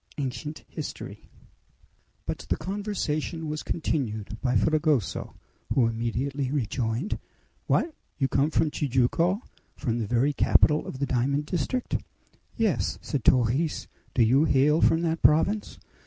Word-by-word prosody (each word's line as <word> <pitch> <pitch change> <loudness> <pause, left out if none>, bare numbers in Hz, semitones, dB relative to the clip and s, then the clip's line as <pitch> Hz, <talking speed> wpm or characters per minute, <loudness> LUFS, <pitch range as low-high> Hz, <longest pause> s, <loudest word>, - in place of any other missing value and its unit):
ANCIENT 145 +2 -4
HISTORY - - -7 1.0
But - - -5
the - - +1
conversation 185 -5 -3
was 150 0 -3
continued 110 -10 -2
by 125 -2 +1
Fragoso, 150 - +1 0.4
who 130 - +5
immediately 125 +4 -1
rejoined: 125 - -1 0.5
"What! 325 - +2 0.2
you 135 - +2
come 140 +3 +2
from 160 -1 +1
Tijuco, 150 - +1 0.3
from 120 -5 -2
the 110 - -2
very 125 +6 +2
capital 150 +2 +3
of - - -6
the 140 - 0
diamond 140 +3 0
district?" 180 - -1 0.6
"Yes," 210 - +1
said 140 -6 -2
Torres. 130 +6 +2 0.3
"Do 120 - +5
you 130 +7 +4
hail 150 +2 +3
from 165 +1 +4
that 165 -1 0
province?" 195 +8 +3
145 Hz, 125 wpm, -27 LUFS, 125-160 Hz, 1.0 s, who